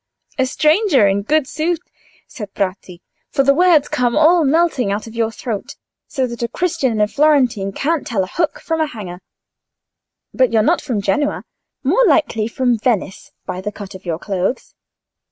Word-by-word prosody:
"A 260 - +2
stranger, 305 - +3
in 200 +1 +1
good 300 +7 +1
sooth," 330 +4 -1 0.5
said 210 -7 -8
Bratti, 185 -2 -4 0.3
"for 275 - +1
the 275 +1 +4
words 330 -2 +4
come 245 -1 0
all 325 +2 +5
melting 285 -7 +2
out 205 +2 -2
of 225 - -10
your 230 -1 0
throat, 225 -2 -5 0.3
so 265 - -1
that 235 -1 -7
a 235 - 0
Christian 320 0 -1
and 215 -1 +2
a - - +2
Florentine 255 -8 +2
can't 305 +8 -1
tell 205 -6 0
a - - -5
hook 325 - -2
from 325 -1 -2
a 310 - +1
hanger. 195 -9 -8 1.1
But 255 -1 +2
you're 220 -2 +3
not 335 +9 +2
from 240 -9 -3
Genoa? 290 +6 0 0.4
More - - +3
likely 275 - +2
from 245 -1 0
Venice, 210 -5 -2
by 180 - -5
the 210 +2 -4
cut 200 -2 -9
of 190 0 -11
your 170 -3 -3
clothes?" 195 +6 -3
245 Hz, 180 wpm, -18 LUFS, 205-305 Hz, 1.1 s, all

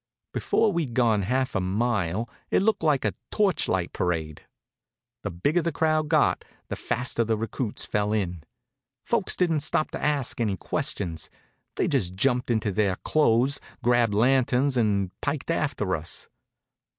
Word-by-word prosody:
Before 220 - +2
we'd 155 -9 -2
gone 115 -5 +3
half 130 +6 0
a 110 - +1
mile 100 0 0 0.2
it - - +2
looked 220 +1 +2
like 150 -4 +2
a - - +1 0.2
torchlight 180 - +1
parade. 80 -4 -2 0.8
The - - -3
bigger 145 - +1
the 170 +1 -1
crowd 155 0 +1
got, 155 -1 +3 0.3
the - - -2
faster 125 0 -1
the 110 -1 0
recruits 115 0 -3
fell 105 0 0
in. 90 -6 -1 0.6
Folks - - 0
didn't 165 -4 +2
stop 155 +1 0
to - - -5
ask 140 -5 0
any 105 -4 0
questions. 85 -2 -2 0.5
They - - +1
just 90 0 0
jumped 125 +4 +1
into 110 -3 +1
their 100 -1 +1
clothes, 135 0 +2 0.2
grabbed 120 -3 +3
lanterns 130 +3 +3
and 100 -6 +1
piked 150 +2 -2
after 135 - 0
us. 80 +1 -5
120 Hz, 150 wpm, -26 LUFS, 100-145 Hz, 0.8 s, gone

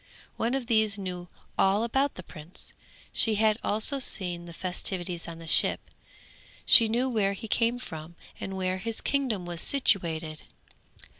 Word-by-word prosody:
One 235 +3 0
of 270 -2 -2
these 220 -3 +2
knew 180 -2 -5 0.3
all 195 +3 +4
about 270 +4 +1
the 185 - -8
prince; 165 +1 -9 0.4
she 220 -2 +3
had 215 +1 +3
also 220 +7 +1
seen 180 -8 +1
the 170 - -9
festivities 180 0 -3
on 165 -1 -7
the 165 - -10
ship; - - +3 0.7
she 230 - +7
knew 240 +4 +1
where 210 -6 +1
he 210 +3 -7
came 230 +3 +1
from 165 -8 -7 0.2
and 190 0 -5
where 185 0 -1
his 225 +2 -3
kingdom 255 -10 -1
was 175 0 -3
situated. 165 - +1
195 Hz, 155 wpm, -28 LUFS, 175-230 Hz, 0.7 s, she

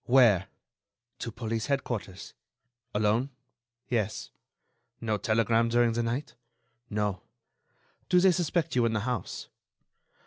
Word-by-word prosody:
"Where?" 115 -7 +5 0.7
"To 115 - -4
police 115 +1 -3
headquarters." 120 -9 -3 0.6
"Alone?" 110 +5 +2 0.6
"Yes." 110 -3 -1 0.7
"No 110 -2 0
telegram 115 +2 +2
during 120 0 +4
the 120 - 0
night?" 120 +5 -2 0.6
"No." 105 -3 -1 0.9
"Do 180 - +6
they 185 +1 +6
suspect 170 -2 0
you 120 -2 +4
in 115 - -1
the 110 - 0
house?" 115 -4 -3
115 Hz, 110 wpm, -29 LUFS, 110-125 Hz, 0.9 s, Do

